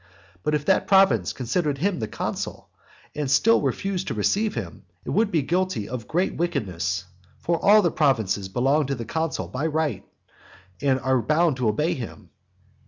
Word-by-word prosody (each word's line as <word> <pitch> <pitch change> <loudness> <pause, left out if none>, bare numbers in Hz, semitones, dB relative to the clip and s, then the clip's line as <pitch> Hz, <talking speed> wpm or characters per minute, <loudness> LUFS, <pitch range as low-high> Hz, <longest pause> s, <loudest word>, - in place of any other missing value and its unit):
But 150 +9 0
if 150 -1 -2
that 190 - +2
province 165 - +4
considered 140 +4 -1
him 185 +3 0
the 110 - -2
consul, - - -5 0.4
and 150 -3 -3
still 225 +12 +4
refused 195 -1 -2
to - - -2
receive 215 +1 +1
him, - - -6 0.2
it - - -4
would 220 -1 +2
be 160 -7 +1
guilty 180 - -1
of 120 -2 -6
great 180 +4 0
wickedness. 95 - -2 0.3
For 170 -1 -2
all 210 +1 +6
the 170 - +2
provinces 110 -11 +1
belong 135 +7 +1
to 140 - -1
the 115 -2 -6
consul 160 +7 -3
of 155 +3 -1
right, 145 - -1 0.8
and 135 -2 +2
are 130 -1 +2
bound 155 +4 +2
to 125 -4 +1
obey 150 +11 0
him. 125 -7 -8
145 Hz, 170 wpm, -24 LUFS, 120-175 Hz, 0.8 s, all